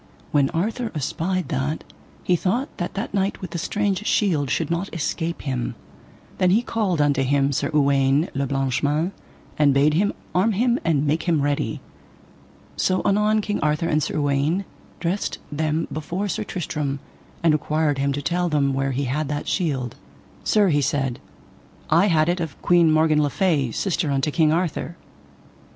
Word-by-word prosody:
When 140 -2 +3
Arthur 220 +7 -2
espied 170 +5 -2
that, 145 +1 -2 0.4
he 180 - +3
thought 220 - -1
that 175 - -4
that 200 +1 -4
knight 195 0 0
with 185 -3 -7
the 170 - -3
strange 205 +2 -1
shield 160 - +2
should - - -1
not 170 +4 -2
escape 165 +1 -2
him. 130 -4 -2 0.6
Then 185 - +4
he 215 +6 +3
called 205 -9 -1
unto 145 -2 +3
him 140 +1 +2
Sir 135 - -1
Uwaine 140 +1 +3
le 140 0 -1
Blanche 135 -1 0
Mains, 150 +5 +1 0.5
and 145 -2 +4
bade 145 +2 +4
him 200 +6 +2 0.2
arm 195 +5 +3
him 240 +4 +2
and 155 -3 +1
make 155 +4 0
him 155 -4 +2
ready. 145 0 -1 1.0
So 185 0 +1
anon 210 +2 +3
King 205 0 -2
Arthur 150 +2 +1
and 155 -1 +2
Sir 150 - -2
Uwaine 145 +6 +1 0.3
dressed 180 +4 -2
them 155 +2 -1
before 175 +6 -3
Sir 195 - -2
Tristram, 150 -5 -3 0.4
and 165 -2 +5
required 150 -1 0
him 140 0 +1
to 140 +1 -3
tell 175 +3 0
them 140 -3 +1
where 135 0 0
he 140 +3 -1
had 140 +4 -1
that 145 +1 -3
shield. 135 - -1 0.5
Sir, 205 -3 +3
he 145 -3 +2
said, 135 -2 -1 0.7
I 170 +6 +5
had 155 -4 +3
it 175 +1 +1
of 160 -5 -5
Queen 170 -2 +5
Morgan 155 -1 +4
le 145 - +1
Fay, 150 -6 +1
sister 175 - -1
unto 140 +2 0
King 155 -1 +3
Arthur. 170 0 -1
155 Hz, 170 wpm, -23 LUFS, 140-180 Hz, 1.0 s, and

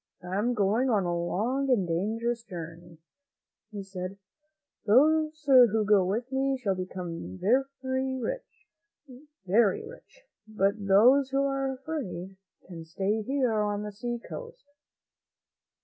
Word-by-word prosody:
"I 180 +1 -5
am 235 +5 0
going 215 +5 +1
on 210 -5 +2
a 175 -1 -1
long 230 +11 -1
and 210 -8 +2
dangerous 225 +7 -1
journey," 170 -4 -9 0.7
he 205 -2 -6
said; 190 0 -7 0.7
"those 310 +6 +3
who 240 -6 +6
go 205 -2 +4
with 225 +8 -2
me 270 0 0
shall 215 -7 -1
become 175 - -6
rich, 265 - -2 0.8
very 200 +1 +3
rich, - - -15 0.2
but 200 -1 -1
those 250 +8 +5
who 275 +1 +1
are 275 -1 -1
afraid 255 - -6 0.3
can 170 -3 -9
stay 195 +6 -2
here 260 0 0
on 205 0 -1
the 210 - -5
seacoast." 240 - -7
220 Hz, 120 wpm, -28 LUFS, 190-265 Hz, 0.8 s, who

